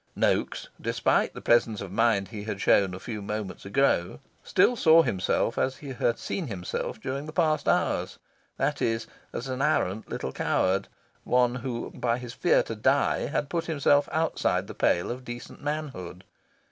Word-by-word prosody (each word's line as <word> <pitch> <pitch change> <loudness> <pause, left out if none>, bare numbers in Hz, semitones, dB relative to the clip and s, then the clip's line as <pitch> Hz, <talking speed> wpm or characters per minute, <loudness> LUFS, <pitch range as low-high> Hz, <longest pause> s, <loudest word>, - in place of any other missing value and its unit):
Noaks, - - 0
despite - - +1
the - - -8
presence 115 -3 +3
of 100 -2 -6
mind 100 -3 +2
he 105 0 -7
had 105 -3 -4
shown 95 -2 +3
a - - -8
few 110 -1 -6
moments 105 -1 -5
ago, 100 -5 +1 0.2
still 245 - +3
saw 165 -6 +6
himself 115 - 0
as 135 0 0
he 145 - -9
had 120 -2 0
seen 180 -6 -4
himself 95 0 -4
during 135 +5 -4
the - - -6
past 155 -1 +1
hours: - - +1 0.4
that - - 0
is, 115 -1 0 0.3
as 125 - -5
an 130 0 -3
arrant 100 -4 0
little 65 - -4
coward 95 +7 +1 0.4
one 125 -1 +3
who 125 -2 -4
by 120 -1 -1
his 125 -2 -7
fear - - +3
to - - -5
die - - +2
had 145 - -1
put 165 +2 -2
himself 145 -2 +2
outside 160 0 0
the - - -8
pale 85 - +1
of 125 +1 -6
decent 120 0 -8
manhood. 140 - -5
120 Hz, 170 wpm, -27 LUFS, 100-140 Hz, 0.4 s, saw